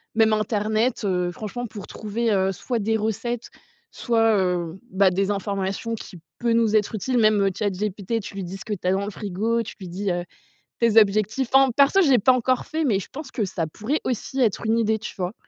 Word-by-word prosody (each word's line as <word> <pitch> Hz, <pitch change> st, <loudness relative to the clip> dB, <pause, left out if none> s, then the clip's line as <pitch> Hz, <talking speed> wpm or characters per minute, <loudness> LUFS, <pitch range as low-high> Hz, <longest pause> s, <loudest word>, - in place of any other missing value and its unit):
même 220 Hz, -1 st, +4 dB
internet, 215 Hz, +2 st, 0 dB
heu, 180 Hz, -2 st, 0 dB
franchement 220 Hz, +6 st, -5 dB
pour 210 Hz, -3 st, -9 dB
trouver, 220 Hz, +1 st, -2 dB
heu, 190 Hz, -1 st, +2 dB
soit 235 Hz, +5 st, -3 dB
des 220 Hz, +2 st, +1 dB
recettes, 225 Hz, +2 st, -3 dB, 0.4 s
soit, 225 Hz, -2 st, +2 dB
heu, 180 Hz, -1 st, -1 dB
bah 190 Hz, 0 st, +4 dB
des 195 Hz, +2 st, 0 dB
informations 200 Hz, +3 st, -2 dB
qui 185 Hz, -4 st, -10 dB, 0.2 s
peut 235 Hz, -1 st, +1 dB
nous 225 Hz, -2 st, +3 dB
être 210 Hz, +1 st, +2 dB
utiles 245 Hz, +5 st, -1 dB
même, 215 Hz, -2 st, +4 dB
heu, -, -, +3 dB
Chat 205 Hz, -2 st, +1 dB
GPT 205 Hz, +3 st, -2 dB
tu 195 Hz, -, -9 dB
lui 195 Hz, -, -4 dB
dis 185 Hz, +2 st, -6 dB
ce -, -, -11 dB
que 215 Hz, -, -3 dB
tu 180 Hz, -, -7 dB
as -, -, +4 dB
dans 195 Hz, +1 st, 0 dB
le 205 Hz, -, -4 dB
frigo 215 Hz, +4 st, -1 dB
tu -, -, -9 dB
lui 185 Hz, -, -8 dB
dis, 190 Hz, +3 st, -3 dB
heu, 175 Hz, 0 st, -1 dB, 0.6 s
tes 230 Hz, -2 st, +3 dB
objectifs. 215 Hz, +4 st, +1 dB
Enfin 270 Hz, -1 st, +6 dB
perso 280 Hz, +7 st, +5 dB
je 305 Hz, -, +3 dB
l'ai 255 Hz, -, +6 dB
pas 255 Hz, +6 st, +5 dB
encore 255 Hz, 0 st, +1 dB
fait 320 Hz, +1 st, -1 dB
mais 205 Hz, -7 st, +2 dB
je 195 Hz, -, -8 dB
pense 290 Hz, -1 st, -8 dB
que 225 Hz, -, -1 dB
ça 170 Hz, -4 st, -3 dB
pourrait 220 Hz, -, -2 dB
aussi 255 Hz, +2 st, -3 dB
être 225 Hz, -1 st, +1 dB
une 225 Hz, +1 st, +2 dB
idée 220 Hz, -1 st, +2 dB
tu -, -, -7 dB
vois? 180 Hz, +1 st, -2 dB
215 Hz, 230 wpm, -24 LUFS, 195-230 Hz, 0.6 s, Enfin